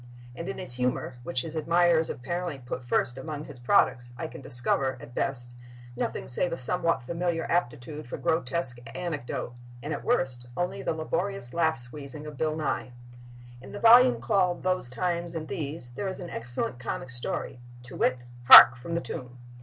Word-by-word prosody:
And 170 - -6
in 195 - -5
his 155 -10 0
humor, 125 0 -1
which 125 0 -2
his 160 0 -7
admirers 165 +1 +3
apparently 170 +4 -4
put 125 0 -6
first 120 +1 +1
among 150 +2 -6
his 125 - -8
products, 120 0 +2
I 160 - -4
can 160 - -8
discover, 130 +1 +1
at 120 - -12
best, 120 -2 -2 0.4
nothing - - -3
save 170 +7 -1
a 165 - -3
somewhat 165 +2 +1
familiar 170 +3 -2
aptitude 150 -3 -2
for - - -5
grotesque 160 -5 -1 0.2
anecdote, 145 -8 -4 0.3
and, 150 +2 -3
at - - -5
worst, 130 - 0
only 175 0 -2
the - - -2
laborious 165 -3 -2
laugh 160 -2 +2
squeezing 140 +4 -7
of 150 -1 -8
Bill 155 +2 -1
Nye. 150 -5 -3 0.7
In 130 - -11
the 205 - -6
volume 245 +3 +7
called 185 -5 +1
"Those 185 -8 0
Times 170 +4 -2
and 155 -1 -4
These" 145 -5 -5
there 165 +11 -4
is 190 - -5
an 175 -2 -7
excellent 120 +1 -2
comic 130 +1 -5
story, 125 0 -4 0.2
to 125 - -10
wit, 130 - +2 0.3
"Hark, 120 -1 +11
From 165 +8 -5
the 170 - 0
Tomb!" 125 -5 -5
150 Hz, 175 wpm, -27 LUFS, 125-170 Hz, 0.7 s, Hark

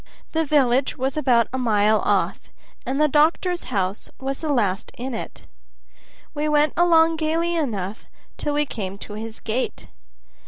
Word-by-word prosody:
The 320 0 +1
village 270 -3 +2
was 265 +1 -1
about 250 -6 +3
a 260 - -1
mile 215 -3 +3
off, - - +1 0.5
and 270 +2 -1
the 305 - +5
doctor's 325 +5 +2
house 195 -3 -2
was 270 0 -4
the 310 -2 -1
last 210 -6 0
in 255 +2 -4
it. 225 - -7 0.9
We 300 +1 -1
went 300 0 +3
along 330 -1 +4
gayly 330 +2 0
enough 215 - -3 0.3
till 295 -1 -2
we 295 0 +2
came 195 -7 -5
to 205 - -9
his 220 +1 -6
gate. 235 +3 -3
265 Hz, 155 wpm, -23 LUFS, 220-305 Hz, 0.9 s, the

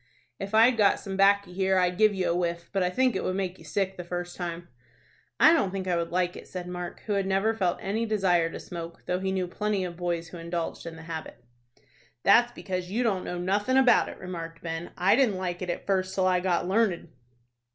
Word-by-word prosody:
"If 200 +2 -3
I'd 230 +2 +6
got 205 -2 +4
some 195 -1 -6
'baccy 200 -1 +3
here, 190 0 +1
I'd 180 0 +1
give 215 -1 +6
you 185 -1 0
a 170 - +1
whiff; 170 -1 -2
but 195 - +1
I 180 - +2
think 255 +6 +1
it - - -1
would 185 - -1
make 190 -1 -3
you - - -14
sick 190 +5 -2
the 180 - -5
first 175 0 -5
time." 175 -1 -5 0.7
"I 320 - +8
don't 205 - +2
think 190 0 -4
I 180 - +1
should 170 0 -1
like 180 0 0
it," - - -10
said 180 -1 -6
Mark, 180 -1 -6
who 210 - -3
had 195 -1 0
never 195 +3 +2
felt 185 -6 0
any 220 +4 -2
desire 185 -6 +2
to - - -7
smoke, 170 -1 -8
though 180 - -1
he 190 0 -1
knew 190 -1 0
plenty 205 +2 -1
of 175 -2 -7
boys 170 -2 -2
who 175 - -9
indulged 170 0 -4
in 165 - -7
the 165 - -11
habit. 160 -1 -7 0.8
"That's 240 +4 +5
because 185 -6 -5
you 230 +6 0
don't 195 -6 0
know 180 - -4
nothin' 205 +8 +1
about 255 -3 +5
it," - - -9
remarked 165 -3 -7
Ben. 165 0 -4
"I 185 +4 +4
didn't 240 -7 +2
like 180 -1 -3
it 180 - -4
at - - -3
first 190 -1 0
till 190 - +2
I 185 -1 +3
got 180 -1 0
learned." 190 -4 +1
185 Hz, 235 wpm, -27 LUFS, 175-200 Hz, 0.8 s, I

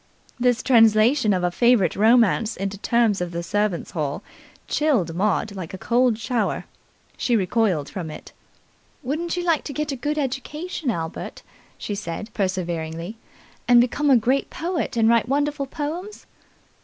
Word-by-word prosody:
This 245 0 +2
translation 225 0 +4
of 185 -2 0
a 175 - +1
favourite 235 -4 +3
romance 225 0 +3
into 195 +1 -4
terms 225 -4 +2
of 180 - -2
the 170 0 -4
servants' 205 0 -1
hall 150 +2 -3 0.4
chilled 250 - +1
Maud 205 +3 0
like 185 -1 -6
a - - -7
cold 240 +2 +2
shower. 225 +2 -1 0.5
She 240 - +1
recoiled 190 -6 +1
from 180 -6 -6
it. 155 - -10 0.7
"Wouldn't 320 +7 -2
you 355 - -1
like 335 -4 +1
to 285 - -5
get 300 +1 -2
a - - -2
good 290 +4 -2
education, 295 +3 -3
Albert," 165 -7 -5 0.3
she 210 - -5
said 200 +2 -6
perseveringly, 175 -1 -3 0.5
"and 240 0 +7
become 285 +5 +2
a 265 - +7
great 255 +5 +1
poet 330 -6 -3
and 225 -1 +4
write 230 +1 +3
wonderful 285 0 0
poems?" 330 +9 -5
230 Hz, 155 wpm, -23 LUFS, 190-270 Hz, 0.7 s, and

